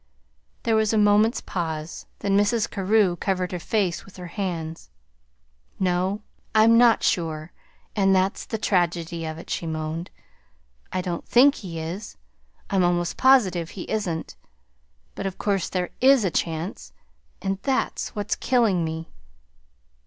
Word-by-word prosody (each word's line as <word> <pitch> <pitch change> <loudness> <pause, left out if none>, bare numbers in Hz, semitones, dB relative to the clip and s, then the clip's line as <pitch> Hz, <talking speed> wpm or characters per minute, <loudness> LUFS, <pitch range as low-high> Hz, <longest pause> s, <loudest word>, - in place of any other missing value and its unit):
There 225 -1 +2
was 220 0 +2
a - - +3
moment's 210 +2 +4
pause, 160 -3 -4
then 200 -1 +1
Mrs. 205 +2 +2
Carew 200 -2 +2
covered 185 -2 -1
her 180 - -3
face 185 -1 -1
with 195 - -16
her 180 - -7
hands. 165 - -4 0.9
"No, 185 +3 0 0.3
I'm 220 +1 +6
not 235 -1 +5
sure 160 -1 -1 0.4
and 195 -2 +4
that's 190 +1 0
the 220 - -2
tragedy 170 -4 0
of 155 0 -5
it," 165 - -10
she 170 - -2
moaned. 160 +2 -4 0.8
"I 185 - -1
don't 175 -2 -4
think 275 +4 +6
he 180 - -7
is; 175 +6 -6 0.5
I'm 195 -2 +3
almost 175 -1 +1
positive 190 -11 +4
he 185 - -7
isn't. 180 -7 -2 0.8
But, 195 - -4
of 190 - -6
course, 200 -3 0
there 180 -1 -2
IS 265 -4 +6
a 180 - +1
chance 165 +3 -3 0.5
and 195 0 -2
that's 270 -1 -1
what's 205 -1 -1
killing 225 -9 +2
me." 160 0 -5
185 Hz, 145 wpm, -24 LUFS, 170-210 Hz, 0.9 s, I'm